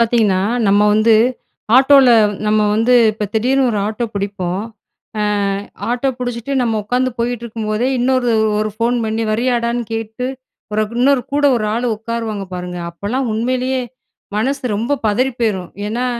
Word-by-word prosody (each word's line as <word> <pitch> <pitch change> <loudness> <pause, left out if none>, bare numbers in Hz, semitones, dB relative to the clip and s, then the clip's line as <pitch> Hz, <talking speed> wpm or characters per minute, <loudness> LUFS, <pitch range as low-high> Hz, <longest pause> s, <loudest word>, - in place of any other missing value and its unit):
பார்த்தீங்கன்னா, 225 -5 +2 0.3
"நம்ம 200 +1 +4
வந்து, 220 +1 +4 0.6
ஆட்டோல 270 0 +6 0.4
நம்ம 215 0 +3
வந்து 230 +3 +3 0.2
இப்ப 210 -1 -3
திடீர்னு 260 +4 +2
ஒரு 215 - -1
ஆட்டோ 220 +3 -2
புடிப்போம். 195 -1 -3 0.6
அ, - - +1 0.7
ஆட்டோ 245 +3 0
புடிச்சுட்டு 245 +1 -4
நம்ம 230 -2 0
உக்காந்து 250 +4 0
போயிட்டுருக்கும்போதே 235 -1 -2
இன்னொரு 250 0 +1 0.3
ஒரு 215 0 -1
ஃபோன் 235 +2 +1
பண்ணி, 220 +1 -1
வரியாடான்னு 235 +1 0
கேட்டு, 225 +2 -4 0.5
பிறகு 215 +2 -1
இன்னொரு 270 0 +3
கூட 290 0 +1
ஒரு 215 -2 -1
ஆளு 240 +2 -1
உட்காருவாங்க 220 -2 -4
பாருங்க?" 180 0 -5
அப்பலாம் 225 +9 -3
உண்மையிலேயே, 255 +3 -1 0.5
மனசு 250 +1 -1
ரொம்ப 230 +6 -1
பதறி 250 +6 +1
போயிரும். 195 -6 -1 0.2
ஏன்னா 240 +4 -2
230 Hz, 135 wpm, -17 LUFS, 215-250 Hz, 0.7 s, ஆட்டோல